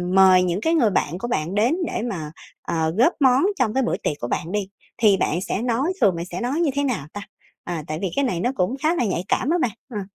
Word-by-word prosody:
mời 185 -1 +7
những 180 +3 -1
cái 325 - +1
người 250 -10 +4
bạn 170 -3 -1
của 240 - -4
bạn 170 -3 -2
đến 230 +7 +3
để - - -3
mà, 155 -6 -5 0.3
ờ, 160 -1 -1
góp 255 +10 +4
món 265 0 +4 0.2
trong 220 -4 +1
cái 265 0 +1
bữa - - 0
tiệc - - -2
của 120 - -4
bạn 165 +6 -3
đi 205 -1 -1 0.3
thì 210 -4 +4
bạn 175 0 0
sẽ 195 +2 -2
nói 255 +9 0
thường 185 -3 +4
bạn 170 - -4
sẽ 185 - -6
nói 245 +1 -1
như 315 -5 +2
thế 285 +1 0
nào 235 - -2
ta? 205 - -6 0.4
À, 170 -3 -4
tại 155 +1 -4
vì 190 - -1
cái 280 - +2
này 180 -9 -1
nó 245 - 0
cũng 185 +6 0
khá 325 +3 +3
là 245 - +1
nhạy 185 -3 -1
cảm 265 - 0
á 345 - +3
bạn, 230 - +1 0.2
ừm. 210 -4 -4
205 Hz, 270 wpm, -22 LUFS, 175-255 Hz, 0.4 s, mời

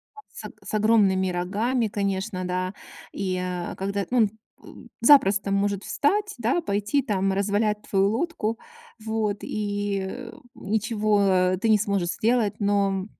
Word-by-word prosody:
А 425 - -12
с - - -9
ог - - -14
с - - -8
огромными 205 -3 +3
рогами, 215 +7 0
конечно, 195 -1 -2
да. 185 +1 -2 0.4
И, 185 -2 -2
а, 180 -1 -4
когда 200 +1 -2
он, 235 -4 +4 0.3
м, - - -13
запросто 205 -7 +5
может 200 0 0
встать, 405 +8 0
да, 245 +9 0
пойти 210 +1 0
там 195 -6 0
развалять 210 +2 0
твою 195 0 +3
лодку. 230 -3 -2 0.4
Вот. 220 -2 -1
И, 205 -1 -2
э, 235 +3 -8 0.2
ничего 205 -3 +1
ты 225 - +1
не 215 - +6
сможешь 200 -4 -1
сделать. 220 +3 +1
Но 200 -2 +1
205 Hz, 140 wpm, -25 LUFS, 195-225 Hz, 0.4 s, не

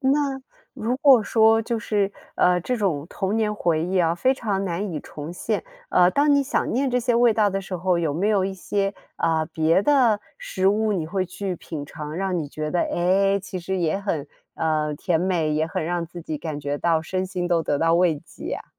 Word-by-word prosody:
那， 275 0 +1 0.3
如 240 +4 -1
果 270 -5 +6
说 225 +1 +4
就 230 0 -2
是， 205 -3 0 0.2
呃， 180 0 +3
这 250 +7 -2
种 165 -8 -1
童 195 +3 -2
年 215 -1 0
回 165 -6 0
忆 185 +1 0
啊， 165 -1 +2
非 260 +9 +2
常 200 -6 -2
难 185 +1 -3
以 150 - -3
重 150 +2 -8
现， 175 - -2 0.2
呃， 180 0 +5
当 285 +3 +3
你 280 - +3
想 - - -1
念 265 +2 +1
这 250 - +1
些 245 0 +1
味 235 0 +5
道 215 -1 +3
的 195 0 -2
时 190 -1 -5
候， 180 0 +1
有 160 -4 0
没 190 +7 0
有 200 -3 +2
一 195 - -2
些， 195 +1 -2 0.2
啊， 160 -1 +1
别 160 +3 +2
的 240 -6 +3 0.2
食 190 0 -2
物 215 +1 +2
你 165 -5 -2
会 185 +2 -1
去 185 0 -4
品 150 -3 -7
尝， 150 0 -7
让 190 -2 -1
你 150 -3 -4
觉 155 +1 -4
得， 175 - +1
哎， 195 +3 +2
其 185 -1 -6
实 190 +2 -3
也 170 +2 0
很 165 -8 -3 0.3
呃， 155 -2 0
甜 165 +1 0
美， 170 -5 0
也 155 +1 +1
很 160 - -3
让 170 0 -2
自 175 +1 -9
己 155 - -4
感 155 -3 -5
觉 145 0 -2
到 165 0 +2
身 185 +3 -2
心 180 -1 -3
都 170 -2 +2
得 145 -1 0
到 165 +2 +3
慰 170 -3 +3
藉 - - -13
呀？ - - -4
185 Hz, 240 characters per minute, -23 LUFS, 165-210 Hz, 0.3 s, 果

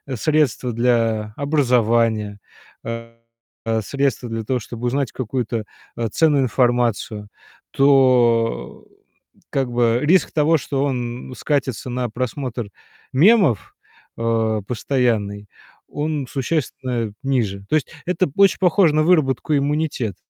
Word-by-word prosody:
средство 130 -3 0
для 115 -3 +1
образования, 115 -7 +1 0.4
а, 115 0 -7 0.6
средство 135 0 -1
для 115 -1 -3
того, 125 +3 -1
чтобы 120 +2 -6
узнать 135 -1 -1
какую-то, 120 -2 -3 0.3
а, 115 -2 -2
ценную 145 +1 +3
информацию, 120 -4 0 0.4
то, 125 -4 +3 0.7
как 135 -3 -1
бы, 120 -1 +2
риск 175 +3 +3
того, 160 +1 +3
что 140 -1 -2
он 125 -1 -4
скатится 130 -4 -2
на 125 -1 -2
просмотр 120 -1 -4 0.4
мемов, 170 - +3 0.4
а, 110 -2 0
постоянный- 110 -3 -1 0.4
он 150 -1 -2
существенно 130 -6 -2
ниже. 115 -8 -1
То - - +2
есть 155 - +1 0.2
это 180 0 +1
очень 200 -1 +5
похоже 180 -3 +3
на 155 - +3
выработку 155 -3 +2
иммунитета. 140 - -1
125 Hz, 110 wpm, -21 LUFS, 115-145 Hz, 0.7 s, очень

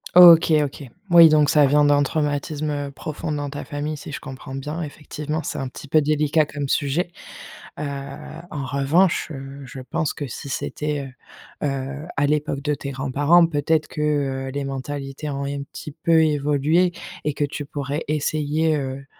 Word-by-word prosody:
OK, 170 -2 +9
OK. 145 +1 -5 0.3
Oui 170 -1 +9
donc 150 -1 +4
ça 150 -2 +5
vient 145 +2 +4
d'un 145 0 +4
traumatisme, 150 +1 -1
heu, 145 -1 -3
profond 155 +2 -5
dans 145 -1 -2
ta 145 - -6
famille 150 0 -4
si 145 - -9
je - - -5
comprends 135 0 -9
bien. 150 +5 -4
Effectivement, 150 +1 -5
c'est - - -4
un 135 - -3
petit 140 - -10
peu 155 +2 +4
délicat 150 +1 +2
comme 145 -2 -5
sujet. 155 +6 0 0.7
Heu, - - -3 0.7
en 140 -3 -4
revanche, 145 +8 +2
heu, 135 0 -8
je 130 +1 -9
pense 140 +3 -2
que 145 - -5
si 140 +3 -7
c'était, 145 +1 -3 0.6
heu 145 - +2
heu, 135 +2 -4
à 145 - +3
l'époque 145 -1 0
de 150 +1 0
tes 140 -1 -5
grands-parents, 145 +6 +3
peut-être 155 0 +1
que, 150 - -5 0.5
heu, - - -4
les 140 +1 -3
mentalités 135 +2 -5
ont 140 0 -3
un 140 0 -3
petit 150 +2 -9
peu 165 -2 +5
évolué. 150 +4 +2 0.3
Et 150 - 0
que 145 - 0
tu 145 +1 -5
pourrais 145 +2 -4
essayer, 155 +1 +1
heu 135 -1 -4
145 Hz, 180 wpm, -23 LUFS, 140-155 Hz, 0.7 s, OK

